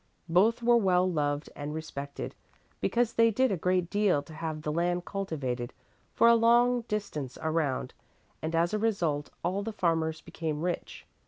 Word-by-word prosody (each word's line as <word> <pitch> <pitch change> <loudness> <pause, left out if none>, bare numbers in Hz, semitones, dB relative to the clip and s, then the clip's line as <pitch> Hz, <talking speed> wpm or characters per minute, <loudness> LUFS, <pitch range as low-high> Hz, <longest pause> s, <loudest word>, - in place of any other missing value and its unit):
Both 215 +8 +3
were 240 0 +5
well 185 -4 +3
loved 145 -3 -1
and 145 +1 -5
respected, 140 -3 -6 0.5
because 240 -1 +1
they 230 0 +5
did 255 +3 +2
a - - +2
great 180 +1 +1
deal 200 -8 +2
to 155 - -13
have 155 -1 -5
the 150 - -1
land 175 +2 0
cultivated 135 -11 -3 0.4
for 230 - +4
a 235 - +8
long 240 +2 +4
distance 155 -11 -4
around 155 -4 -1 0.5
and 160 +1 -2
as 170 +4 +2
a 215 - +1
result 170 -10 0
all 185 +4 0
the 225 +2 -4
farmers 160 -5 0
became 155 -2 -4
rich. 180 -1 -4
175 Hz, 165 wpm, -29 LUFS, 155-210 Hz, 0.5 s, a